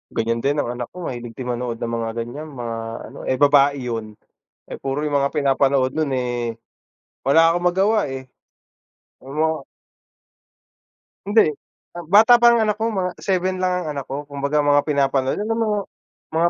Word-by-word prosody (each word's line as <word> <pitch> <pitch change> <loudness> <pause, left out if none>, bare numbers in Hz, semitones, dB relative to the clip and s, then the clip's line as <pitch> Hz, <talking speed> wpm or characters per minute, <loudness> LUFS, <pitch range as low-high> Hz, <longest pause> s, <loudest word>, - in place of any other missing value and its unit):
Ganiyan 115 +1 0
din 140 +1 +1
ang 120 - -1
anak 120 -1 -5
ko, 180 - -7
mahilig 120 -4 -6
din 125 -1 -4
manood 120 -1 -3
ng 115 - -2
mga 115 0 -2
ganiyan, 120 +7 -5
mga 120 -5 -5 0.3
ano, - - -12
eh, 130 - +2
babae 140 0 +5 0.2
'yon. 110 -2 -5 0.5
Eh, - - -6
puro 135 +2 -3
'yong 145 -2 0
mga 140 0 0
pinapanood 135 -2 +2
no'n, 155 -3 0
eh, 120 -2 -2 0.7
wala 165 +4 +5
akong 175 0 +1
magawa, 195 -1 +1
eh. 130 0 -6 0.9
Ang 135 +2 -11
mga 160 -3 0 1.6
Hindi. 205 -4 +4 0.5
Ah, 175 - -6
bata 220 +8 +7
pa 235 0 +6
ang 235 - +3
anak 215 -1 +1
ko, 225 +1 -1
mga 185 -2 -1
7 185 -1 -1
lang 185 0 0
ang 160 - -6
anak 140 - -4
ko. 145 +2 -6
Kumbaga 140 +1 0
mga 145 0 +4
pinapanood 135 -1 +1
alam 225 +2 -1
mo 225 -1 0 0.6
mga 165 +2 +2
145 Hz, 175 wpm, -21 LUFS, 130-180 Hz, 1.6 s, bata